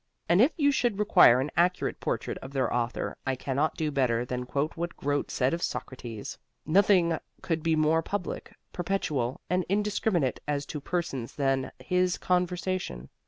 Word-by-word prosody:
And 175 +4 +5
if 270 +7 +5
you 285 -3 +4
should 240 -6 +1
require 205 - +6
an 135 +3 -2
accurate 180 +1 +1
portrait - - -2
of 135 +1 -10
their 130 -3 0
author 120 0 -2
I 135 - -1
cannot 140 +4 -1
do 155 -1 -1
better 125 -4 +1
than 125 0 -4
quote 140 +4 -1
what 170 +1 -4
Grote 145 0 -1
said 130 +2 +1
of 170 - -2
Socrates: 120 -9 -5 0.3
Nothing 175 -1 +4 0.2
could 165 -2 -1
be 160 0 +2
more 155 +1 +3
public, 200 +2 -4 0.2
perpetual, 150 -9 -1
and 180 0 +1
indiscriminate 200 - +1
as 145 -1 -1
to 150 0 -6
persons 150 -8 -3
than 135 -2 0
his 180 +7 +1
conversation. 180 - -1
155 Hz, 165 wpm, -28 LUFS, 130-180 Hz, 0.3 s, require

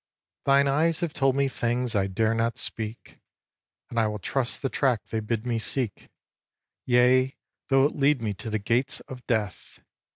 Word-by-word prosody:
xx. - - -67
Thine 140 0 +5
eyes 155 +4 +2
have 170 -3 -2
told 135 -3 +2
me 140 0 +2
things 120 -1 -1
I 95 -1 +2
dare 110 +4 +1
not 115 +1 0
speak; 110 0 -4 0.7
And 120 - 0
I 110 - +3
will 105 0 -3
trust 130 +7 -2
the - - +2
track 130 -6 +1
they 110 - -3
bid 110 +1 -3
me 120 -2 0
seek, 115 -1 -3 0.8
Yea, 130 +2 +4 0.3
though 135 0 +4
it 145 - 0
lead 145 0 +3
me 110 -3 -2
to 110 +4 -7
the 110 - 0
gates 120 +6 0
of 125 -1 -10
death! 105 -5 -2
125 Hz, 185 wpm, -26 LUFS, 110-135 Hz, 0.8 s, Thine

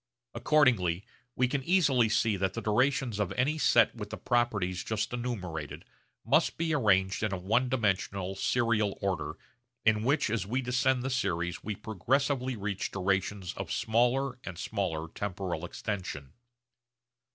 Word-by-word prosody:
Accordingly 110 - +2 0.3
we 125 - +2
can 135 +1 -2
easily 135 -10 +3
see 110 0 +2
that 95 -1 -1
the 115 - -3
durations 120 0 +1
of 105 -4 0
any 145 +5 0
set - - +4
with - - -7
the - - -6
properties 100 -7 0
just 110 +2 -2
enumerated 95 - -4 0.4
must 155 +8 +2
be 165 -1 0
arranged 95 -8 +2
in 110 -3 0
a 95 - -1
one 110 +8 +1
dimensional 100 -5 0
serial 110 0 +1
order 100 -2 -2 0.5
in 110 -1 +4
which 135 -2 +2
as 110 -4 0
we 115 +7 -1
descend 125 0 +1
the 130 - -2
series 90 -8 -1
we 105 -1 -3
progressively 130 +6 0
reach 100 -2 -3
durations 95 0 -1
of - - -6
smaller 125 +3 +1
and 90 -4 -7
smaller 85 -4 -2
temporal 90 -2 -4
extension. 90 -7 -5
110 Hz, 145 wpm, -30 LUFS, 95-125 Hz, 0.5 s, set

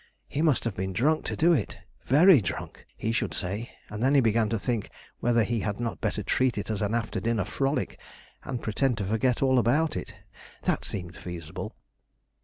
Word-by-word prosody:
He 145 - -2
must 155 -5 +3
have 115 - -1
been 95 0 -3
drunk 150 - +2
to - - -2
do 170 +2 +4
it 150 - -1 0.3
very 155 +2 +7
drunk, 90 - -5
he 110 - -1
should 115 - -1
say; 100 +5 -3 0.2
and 105 +1 -6
then 135 +3 +3
he - - +7
began 115 -2 +2
to 115 - 0
think 115 0 -2 0.3
whether 120 -1 +3
he 115 +1 -1
had 105 0 -2
not 120 -1 -3
better - - -1
treat 130 -3 +1
it 100 +2 -3
as 105 - -2
an 105 +2 0
after 115 -2 -1
dinner 115 -4 0
frolic, 135 +6 -1 0.4
and 125 -2 -4
pretend 120 +2 +1
to 100 - -2
forget 115 +6 +1
all 130 -1 +4
about 145 +7 +2
it. - - -5 0.5
That - - 0
seemed 90 -3 -5
feasible. 85 -3 -7
115 Hz, 200 wpm, -27 LUFS, 105-130 Hz, 0.5 s, very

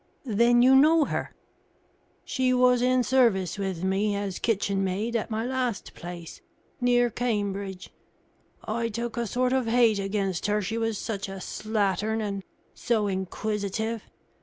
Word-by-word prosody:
"Then 240 +1 +4
you 260 +1 +6
know 305 +3 +6
her?" - - -3 0.9
"She 255 -1 +1
was 250 -1 +4
in 255 0 +3
service 225 -9 +2
with 190 -3 -3
me, 200 +2 +1
as 200 -2 -3
kitchenmaid, 200 +1 0
at 230 - -1
my 220 +1 -2
last 250 -5 -2
place, 175 -1 -9 0.4
near 245 -1 +3
Cambridge. 200 -5 -3 0.7
I 230 +1 -2
took 235 +1 -4
a 235 -1 -2
sort 250 +4 0
of 260 -3 +1
hate 225 -3 +4
against 195 -2 -1
her, 210 0 +1
she 220 +3 -2
was 225 -2 -1
such 200 -3 -4
a 195 0 -6
slattern 215 +1 -1
and 200 -2 -3 0.3
so 225 -3 0
inquisitive. 205 +3 -2
220 Hz, 140 wpm, -26 LUFS, 195-240 Hz, 0.9 s, you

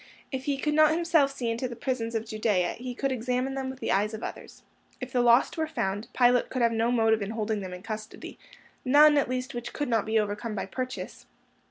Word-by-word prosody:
If 265 -1 -4
he 280 -1 0
could 300 +2 -1
not 310 0 +6
himself 320 -3 +2
see 245 -4 -3
into 235 +3 -2
the 240 - -7
prisons 230 -2 -3
of 225 0 -1
Judea, 215 -4 0
he 250 0 -6
could 275 +1 -1
examine 250 +2 -1
them 265 -1 -3
with 260 0 -8
the - - -2
eyes 210 +3 +1
of 220 - -8
others. - - -8 0.4
If - - -6
the 250 - +3
lost 240 +6 +4
were 315 - 0
found, 205 -8 -3
Pilate 245 -1 +3
could 255 -2 -1
have 235 - +4
no 230 +1 +1
motive 225 -2 +3
in 200 - -3
holding 220 -1 -2
them 185 -1 -6
in 180 +1 -9
custody—none, 255 +6 0
at 285 -4 +2
least, 255 +1 -3
which 240 0 -6
could 290 -3 -3
not 225 -3 +1
be 220 0 +1
overcome 210 +1 -3
by 195 - -3
purchase. 255 +6 -6
240 Hz, 225 wpm, -27 LUFS, 220-265 Hz, 0.4 s, not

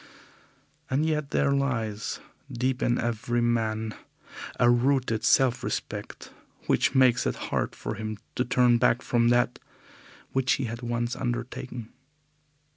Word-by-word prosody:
And 140 +4 +1
yet 150 -3 -1
there 140 - +2
lies 115 -7 -1 0.3
deep 125 +1 -1
in 120 - +2
every 120 +1 -1
man 110 -2 0 0.7
a 120 - +5
rooted 120 -2 +2
self 130 -2 +3
respect - - -5 0.3
which - - +2
makes 125 -2 +4
it - - -1
hard - - -2
for - - -4
him 110 0 -5 0.2
to 125 - 0
turn 120 -1 +3
back 120 +2 +2
from 120 -1 +2
that 120 0 +2 0.7
which 130 0 +2
he 135 - -1
has 120 0 -4
once 120 0 -2
undertaken. 120 -1 -4
120 Hz, 130 wpm, -27 LUFS, 115-130 Hz, 0.7 s, a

